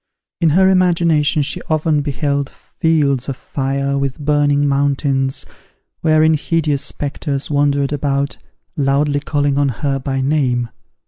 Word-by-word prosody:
In 165 - +3
her 190 0 +5
imagination 170 -5 +2
she - - -3
often 155 -1 +1
beheld 140 0 -1
fields 145 -5 -1
of 135 - -3
fire, 140 +1 -2
with 140 -1 -2
burning 145 -1 +1
mountains, 140 -1 0 0.5
wherein 155 0 +3
hideous 150 -2 0
spectres 140 0 -3
wandered 145 0 +1
about, 140 -1 -1 0.4
loudly 145 +1 +1
calling 145 -1 0
on 140 -1 +2
her 135 +3 -2
by 135 0 -3
name. 130 -4 0
145 Hz, 125 wpm, -17 LUFS, 140-150 Hz, 0.5 s, her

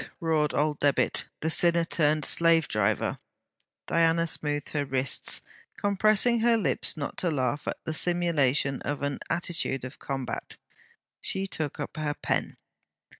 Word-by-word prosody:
roared 160 -4 0
old 150 0 0
Debit, 145 -1 +2 0.2
the 160 - 0
sinner 170 0 +4
turned 155 -2 +1
slavedriver. 160 - +2 0.7
Diana 165 0 +2
smoothed 145 -3 -1
her 150 -2 -1
wrists, 135 -1 0 0.4
compressing 215 +4 +3
her 230 0 +3
lips 160 - 0
not 145 - -5
to 180 - 0
laugh 145 -1 -2
at - - -2
the 160 - -3
simulation 150 -6 +1
of 145 -1 -4
an 145 -1 -2
attitude 170 -7 -1
of 130 +1 -8
combat. 135 -2 -5 0.6
She 190 0 0
took 155 -7 -4
up 145 - -6
her 150 -1 -2
pen. - - -2
155 Hz, 135 wpm, -27 LUFS, 140-170 Hz, 0.7 s, sinner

